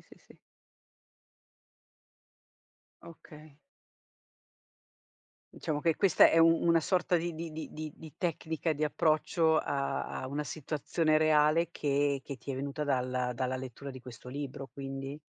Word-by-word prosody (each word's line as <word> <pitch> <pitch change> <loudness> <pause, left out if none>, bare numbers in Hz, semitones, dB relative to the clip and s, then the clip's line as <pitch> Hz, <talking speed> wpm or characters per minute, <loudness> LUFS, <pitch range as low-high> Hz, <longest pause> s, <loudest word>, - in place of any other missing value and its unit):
sì, - - -18
sì. - - -20 2.7
Okay. 155 -3 -14 2.0
Diciamo, 155 -3 -2
che 165 0 +2
questa 195 0 +6
è - - +2
u 165 0 +7 0.2
una 170 -1 +5
sorta 180 +1 +1
di 170 +1 -2
di 165 0 -6
di 155 0 -6
di 155 -1 -6
di 160 -2 -12
tecnica 160 -2 -1
di 150 0 -4
approccio 160 +1 +2
a 140 -2 -1 0.2
a - - -4
una 145 +3 -2
situazione 155 +2 0
reale 155 +1 +4
che 145 -2 0
che 140 - -6
ti - - -7
é 135 - -3
venuta 140 +2 -3
dalla 125 -3 0
dalla 130 +1 -2
lettura 130 +2 -7
di 130 - -10
questo 125 0 -11
libro, 135 0 -6
quindi? 135 0 -6
150 Hz, 135 wpm, -31 LUFS, 135-160 Hz, 2.7 s, u